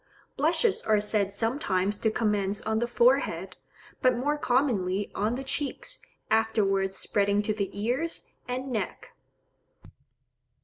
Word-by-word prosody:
Blushes 455 -5 +2
are 215 -1 +3
said 205 -1 +1
sometimes 205 -3 0
to 220 - +1
commence 210 -2 0
on 220 0 0
the 240 - 0
forehead, 475 - +2 0.4
but 255 -2 +4
more 290 +4 +1
commonly 220 -9 +1
on 215 +4 0
the 265 - -4
cheeks, 290 - -3 0.3
afterwards 195 -3 +2
spreading 200 0 +1
to 215 - 0
the 200 -2 -2
ears 255 +10 -1 0.2
and 255 +2 -3
neck. 220 -4 -4
220 Hz, 125 wpm, -28 LUFS, 200-255 Hz, 0.4 s, but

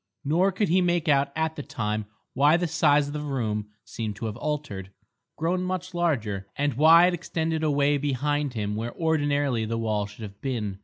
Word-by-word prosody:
Nor 175 +7 +3
could 195 0 0
he 185 +3 +4
make 175 -2 +1
out 140 -1 +3
at 160 0 -1
the - - -5
time 105 -5 -3 0.3
why 145 +5 +4
the 175 - -1
size 150 -3 +3
of 145 - -6
the 150 - -3
room 110 -8 -2 0.2
seemed 110 -3 -5
to 115 - -6
have 110 0 -4
altered, 140 -10 -4 0.5
grown 175 +3 0
much 185 0 -3
larger, 115 - -1
and 145 -1 0
why 160 +6 +7
it 180 - +2
extended 160 -2 -2
away 145 -1 +2
behind 145 0 -1
him 105 -1 -2
where 115 +2 -4
ordinarily 145 -6 +1
the 115 +1 -2
wall 105 -2 -1
should 105 +2 -11
have 100 -1 -10
been. 110 -8 -3
145 Hz, 195 wpm, -26 LUFS, 110-160 Hz, 0.5 s, why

